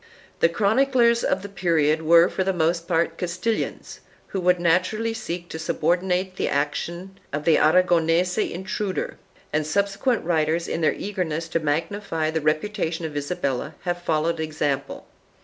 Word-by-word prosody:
The 165 - +4
chroniclers 235 +5 +3
of 190 - 0
the - - -5
period 165 -5 +1
were 170 +2 +6
for 190 - -2
the 190 - +1
most 170 0 0
part 165 -1 0
Castilians 180 +6 -3 0.3
who 195 - -3
would 180 0 +3
naturally 185 +7 +1
seek 180 -6 -5
to 160 - -6
subordinate 180 +3 0
the - - 0
action 170 +6 -3
of 145 +1 -3
the 165 - +5
Aragonese 175 +2 +3
intruder, 190 +2 -3 0.3
and 155 +1 +2
subsequent 200 - 0
writers, 165 0 +1
in 165 - -2
their 155 - +3
eagerness 170 -5 -3
to 165 - 0
magnify 160 +1 -1
the 160 0 -1
reputation 165 +2 -1
of 155 -2 -6
Isabella, 145 -1 -2
have 175 -1 -3
followed 165 0 0
the 160 - -2
example. 145 -3 -2
170 Hz, 150 wpm, -24 LUFS, 160-190 Hz, 0.3 s, were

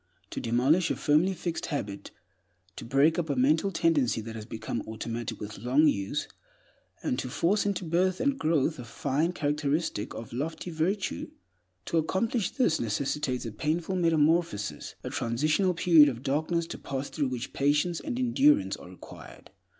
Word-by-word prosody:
To - - -4
demolish 135 +9 +2
a - - 0
firmly 165 +6 +2
fixed 170 -1 -3
habit, 100 -10 -4 0.7
to - - -8
break 140 +8 +3
up 160 -2 -2
a 140 - +1
mental 155 +9 +3
tendency 160 -9 +2
that 110 +1 -7
has 110 -1 -8
become 110 -1 -4
automatic 115 +1 -5
with 105 0 -7
long 130 +8 +3
use, 100 -8 -1 0.8
and 125 - -1
to 130 - -3
force 200 +10 +1
into 195 -3 -1
birth 180 +3 +1
and 275 +1 +1
growth 155 -1 +1
a - - -5
fine 140 +7 -1
characteristic 150 -6 -1
or 115 - -6
lofty 160 +8 -4
virtue—to 95 - -4
accomplish 195 +7 0
this 240 - +1
necessitates 130 +3 -1
a 115 - -4
painful 160 - -1
metamorphosis, 160 - +1
a - - -5
transitional 155 - +1
period 165 -4 +6
of 120 -1 -6
darkness, 160 +5 0
to - - -8
pass 135 0 -4
through 145 -3 0
which 125 -1 -5
patience 150 +5 +1
and 270 -5 -4
endurance 270 +4 +3
are - - -12
required. - - -13
150 Hz, 160 wpm, -28 LUFS, 125-170 Hz, 0.8 s, period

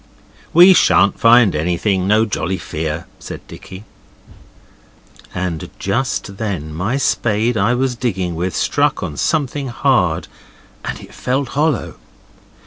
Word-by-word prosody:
'We 180 +3 +8
shan't 95 - +3
find 115 -5 +5
anything. 90 +4 0
No 110 +2 +3
jolly 95 -3 -2
fear,' 80 -1 -4
said - - -9
Dicky. 95 +2 -11 1.5
And 90 -4 -3
just 100 -2 -2
then 90 -9 -4
my 100 - -1
spade 115 -3 0
I 110 +4 +2
was 130 0 0
digging 95 -8 -2
with 90 +1 -3
struck - - +1
on 75 - -5
something 145 - -1
hard, 120 - +1 0.6
and - - -5
it - - -14
felt 130 +1 -2
hollow. 150 -3 -1
105 Hz, 125 wpm, -18 LUFS, 90-125 Hz, 1.5 s, We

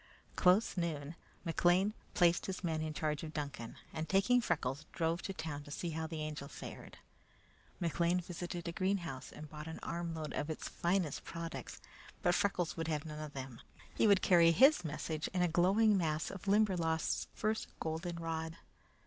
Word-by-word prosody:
Close 185 +3 +4
noon, 155 -3 -2 0.3
McLean 175 +4 +3 0.2
placed 175 -2 +4
his 190 0 -4
men 160 -2 0
in 155 0 -2
charge 150 -1 -1
of 155 -1 -7
Duncan, 140 -6 -4 0.2
and 160 0 -3
taking 205 +6 +4
Freckles, 140 - -1
drove 165 0 0
to - - -4
town 160 -5 -4
to 145 - -12
see 165 +3 -3
how 160 0 -2
the 160 -1 -4
Angel 150 -2 -5
fared. - - -9 0.8
McLean 170 +1 +2
visited 175 0 -5
a - - -1
greenhouse 170 -8 -2
and 155 - -9
bought 150 +1 -8
an 160 - -5
armload 165 -2 -3
of 145 - -2
its 155 - -4
finest 175 -4 0
products; 165 0 -6 0.4
but 175 -2 +4
Freckles 180 -3 +1
would 165 -1 -3
have 155 -1 -1
none 150 -1 -6
of 155 -1 -6
them. 130 -3 -7 0.3
He - - +3
would 200 -2 +5
carry 170 -2 +7
his 270 - +6
message 155 0 -3
in 180 - +3
a - - +4
glowing 195 +6 +4
mass 155 -3 0
of 195 - -8
the - - -1
Limberlost's 180 -6 +2
first 215 +1 0
goldenrod. 165 0 -3
165 Hz, 175 wpm, -35 LUFS, 155-180 Hz, 0.8 s, carry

